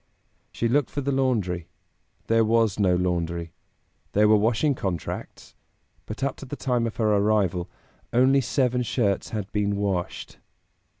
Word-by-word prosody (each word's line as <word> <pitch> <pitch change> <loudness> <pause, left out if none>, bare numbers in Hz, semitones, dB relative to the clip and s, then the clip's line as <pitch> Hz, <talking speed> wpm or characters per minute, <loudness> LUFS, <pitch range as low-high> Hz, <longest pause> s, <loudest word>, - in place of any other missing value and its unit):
She 115 - -1
looked 135 +3 +2
for 145 - -3
the 140 +1 -1
laundry; 110 -11 0 0.6
there 115 0 +3
was 110 -2 +2
no 95 -3 +3
laundry. 85 -2 -2 0.6
There 105 +1 +4
were 110 - +6
washing 115 +7 +2
contracts, 95 -9 -5 0.5
but 110 +5 -6
up 140 -1 -1
to - - -9
the 145 - -5
time 125 -4 0
of 110 - -6
her 110 -2 +2
arrival 100 -4 +1 0.4
"only 130 +3 +4
seven 125 0 +1
shirts 110 -5 0
had 105 -3 -5
been 100 -1 0
washed." 100 -3 -3
110 Hz, 145 wpm, -25 LUFS, 95-125 Hz, 0.6 s, were